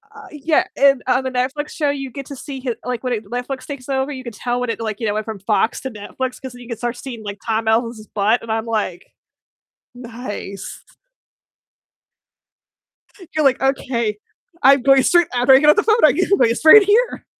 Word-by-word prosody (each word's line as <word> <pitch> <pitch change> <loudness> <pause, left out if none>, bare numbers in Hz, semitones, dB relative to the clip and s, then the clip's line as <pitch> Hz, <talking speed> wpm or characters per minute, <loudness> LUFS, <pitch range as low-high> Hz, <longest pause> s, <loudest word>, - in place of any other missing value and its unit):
Uh, - - -12
yeah, 300 +1 +1
and 275 -2 +4
on 255 +1 +2
the 260 - -3
Netflix 260 +4 -2
show 295 -3 -1
you 275 -2 -4
get 275 +1 -8
to 280 - -8
see 270 0 -8
hi 250 -3 -3
like, 250 -1 -4
when 250 -1 -1
it, 220 -2 -4
Netflix 250 +4 -5
takes 280 -2 -8
over, 265 +1 -1
you 260 -2 -7
can 235 - -7
tell 245 +3 -3
when 250 -1 -3
it, 225 - -3
like, 220 -2 -4
you 225 - -2
know, 205 - 0
went 215 0 -3
from 220 -3 -6
Fox 215 +3 0
to 265 - -5
Netflix 250 +4 -6
'cause 260 -2 -8
then 245 - -13
you 240 - -12
can 235 -2 -5
start 240 +1 -4
seeing, 245 -4 -8
like, 205 -1 -7
Tom 225 0 -1
Ellis's 225 -1 0
butt, 215 +3 +1
and 230 - -6
I'm 220 0 -1
like, 210 -6 -3 0.9
"Nice." 230 -5 -8 2.5
You're 310 -2 +1
like, 265 -1 +3
"Okay, 245 -5 -1 0.4
I'm 275 0 +6
going 270 +1 +5
straight 345 +2 +4
after 250 +2 +4
I 265 - +8
get 300 +1 +4
off - - +6
the 435 - +2
phone, 435 - +3
I'm - - +6
go - - +2
gonna - - +4
go - - +2
straight 320 - +7
here." 440 +5 +1
250 Hz, 215 wpm, -19 LUFS, 225-275 Hz, 2.5 s, I